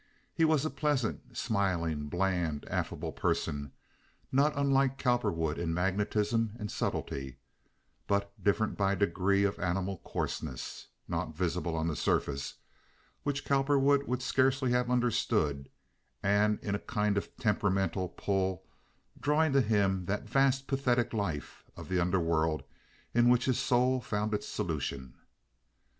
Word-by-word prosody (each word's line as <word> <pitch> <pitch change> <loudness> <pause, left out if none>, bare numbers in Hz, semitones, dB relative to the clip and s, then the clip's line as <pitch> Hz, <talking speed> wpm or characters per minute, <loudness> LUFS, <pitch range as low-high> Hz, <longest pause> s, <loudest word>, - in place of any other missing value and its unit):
He 165 - +3
was 155 -2 +3
a 155 - -1
pleasant, 130 -4 -1
smiling, 85 - 0
bland, 90 -4 0
affable - - -2
person, 70 -1 -1 0.6
not 140 +3 +4
unlike 135 -1 +2
Cowperwood 105 - 0
in 80 -1 -1
magnetism 105 +4 0
and 105 -3 -4
subtlety, 65 -2 -3 0.7
but 100 0 +1
different 105 +2 +1
by 100 0 +3
a - - 0
degree 100 +1 +2
of 100 -1 0
animal 90 +1 -1
coarseness - - -4 0.2
(not 80 - -3
visible 85 -1 -1
on 80 0 -1
the 80 - -1
surface) 70 -2 -1 0.7
which 145 0 -2
Cowperwood 140 0 +3
would 125 +1 -1
scarcely 130 -1 +2
have 125 0 +2
understood, 105 - +1 0.5
and 105 +1 +3
in 100 - -2
a 100 - 0
kind 105 -1 0
of 100 - -3
temperamental 95 -4 0
pull 95 -1 -1 0.6
drawing 150 0 +2
to 135 - +5
him 100 -5 +1
that 105 +5 -2
vast 135 +2 +2
pathetic 125 -4 +1
life 95 -9 -3
of - - -9
the 95 -1 +1
underworld 85 -3 +1 0.5
in 120 +1 +5
which 125 0 +4
his 130 -2 +1
soul 125 +1 +2
found 105 -2 -2
its 105 - -2
solution. 65 -3 -3
105 Hz, 135 wpm, -31 LUFS, 90-125 Hz, 0.7 s, to